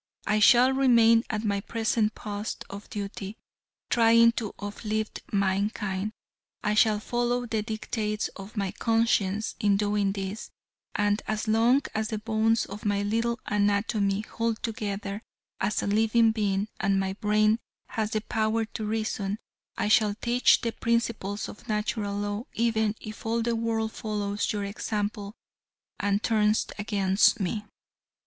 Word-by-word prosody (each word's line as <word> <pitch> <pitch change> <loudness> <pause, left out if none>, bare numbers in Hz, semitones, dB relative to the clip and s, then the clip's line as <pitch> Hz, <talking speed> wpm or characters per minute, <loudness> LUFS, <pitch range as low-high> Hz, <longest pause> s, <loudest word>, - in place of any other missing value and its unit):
I 210 0 +2
shall 245 +4 +6
remain 235 -4 +5
at 215 -1 -2
my 200 -2 0
present 220 0 0
post 210 0 -5
of 200 +1 -9
duty, 200 0 -5 0.5
trying 230 0 +6
to 225 -3 -4
uplift 215 +1 -3
mankind, 200 +1 0 0.5
I 210 -1 +1
shall 215 0 +4
follow 240 +2 -1
the 225 -2 -1
dictates 215 -1 -2
of 200 +3 -11
my 195 -2 -1
conscience 225 -3 +1
in 205 -3 +3
doing 205 -1 +1
this, 195 +2 -5 0.5
and 205 0 +1
as 215 +1 -2
long 235 +5 +4
as 220 0 -1
the 215 - -3
bones 220 +1 +1
of 205 +2 -9
my 205 -1 +1
little 230 +3 0
anatomy 205 0 +1
hold 230 +1 -3
together 205 -2 -3 0.4
as 195 +2 0
a - - -1
living 225 +2 +4
being 205 -2 0
and 195 -1 +2
my 190 0 -1
brain 215 +2 +2 0.3
has 220 -2 -1
the 215 -1 -1
power 220 0 0
to 220 - -6
reason, 215 -2 -2 0.4
I - - 0
shall 210 -1 +4
teach 240 +3 +3
the 230 - -1
principles 230 -4 -1
of 210 - -12
Natural 210 -1 -1
Law 205 +3 -3
even 220 -2 +1
if 215 -1 -9
all 230 +1 0
the 235 0 0
world 225 -1 -1
follows 205 -2 -2
your 205 -2 -2
example 205 +1 -3 0.6
and 205 +1 0
turns 215 -1 +2
against 205 +1 +3
me." 210 +2 -2
215 Hz, 145 wpm, -27 LUFS, 205-225 Hz, 0.6 s, shall